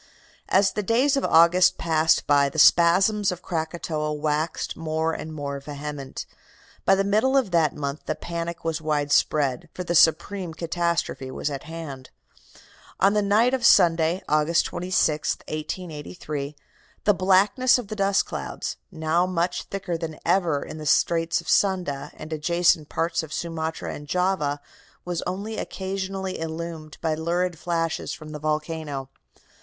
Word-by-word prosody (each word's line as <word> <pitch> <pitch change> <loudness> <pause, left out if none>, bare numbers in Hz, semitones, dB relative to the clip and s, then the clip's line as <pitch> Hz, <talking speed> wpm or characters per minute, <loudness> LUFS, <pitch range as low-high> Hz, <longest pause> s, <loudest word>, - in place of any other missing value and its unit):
"As 195 +1 +4
the 210 - -2
days 250 +8 +2
of 275 - 0
August 170 +3 +5
passed 160 -1 +2
by 140 -1 +4
the 150 - -9
spasms 185 +6 +5
of 180 0 -7
Krakatoa 160 -2 -3
waxed 150 +2 -2
more 160 0 -1
and 160 - -6
more 140 -2 -4
vehement. 145 -1 -6 0.6
By 195 - +6
the 195 - +1
middle 215 +7 +2
of 245 -8 +1
that 165 -3 +2
month 140 0 -5
the 155 - -1
panic 170 0 -5
was 165 -1 -1
widespread, 145 -3 +1
for 180 - -4
the 175 - -2
supreme 170 +2 +3
catastrophe 170 -5 -2
was 145 - -3
at 135 -1 -6
hand. 160 -5 -8 0.9
On 200 +1 +4
the 210 - +2
night 215 +5 +3
of 260 -2 0
Sunday, 170 -3 +4
August 155 +3 +2
26, 175 -4 0
1883, 150 -2 -5 0.5
the 210 - +4
blackness 195 +8 +4
of 240 -5 -6
the 215 - -4
dust 195 -1 +2
clouds, - - -5
now 165 0 0
much 175 0 -1
thicker 185 -4 -4
than 160 -2 -5
ever 170 -5 +2
in 155 - -8
the 155 - -5
Straits 165 +3 +2
of 170 - -18
Sunda 180 -8 +1
and 160 - -7
adjacent 165 0 +2
parts 165 0 0
of 160 -2 -9
Sumatra 160 -1 -4
and 145 - -9
Java, 180 -5 0 0.4
was 175 -2 -2
only 200 +4 -4
occasionally 190 0 -4
illumined 160 -1 -6
by 160 -2 0
lurid 170 +1 -1
flashes 165 -2 -2
from 155 - -9
the 150 - -6
volcano. 150 -2 -3
165 Hz, 150 wpm, -24 LUFS, 155-185 Hz, 0.9 s, By